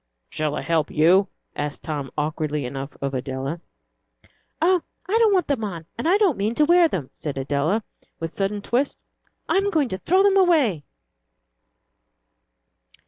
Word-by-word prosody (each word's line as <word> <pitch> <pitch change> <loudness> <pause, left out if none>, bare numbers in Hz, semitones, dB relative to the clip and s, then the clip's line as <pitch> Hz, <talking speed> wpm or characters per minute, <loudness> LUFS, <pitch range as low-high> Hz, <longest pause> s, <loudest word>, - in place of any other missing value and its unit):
"Shall 150 -1 -2
I - - -3
help 160 -2 +1
you?" 180 +6 +4 0.3
asked 145 -1 -4
Tom, 145 -4 -4
awkwardly 150 -1 -1
enough, 135 +2 -6
of 140 0 -2
Adela. 135 +4 -4 1.0
"Oh, 355 +2 +3 0.3
I 400 - 0
don't 450 -2 +5
want 370 -4 +3
them 275 -6 -1
on, 170 -6 -5
and 235 +9 -1
I 385 - +5
don't 385 - +2
mean 215 +4 0
to 300 - +4
wear 345 +1 +6
them," 155 - -4
said 145 -3 -5
Adela, 145 +10 0 0.4
with 165 0 -4
a - - -33
sudden 200 +1 -2
twist. 255 +6 0 0.5
"I'm 395 +1 +2
going 305 -9 +1
to 185 - -4
throw 375 - +3
them 395 -1 +4
away." 300 - +3
190 Hz, 160 wpm, -23 LUFS, -, 1.0 s, wear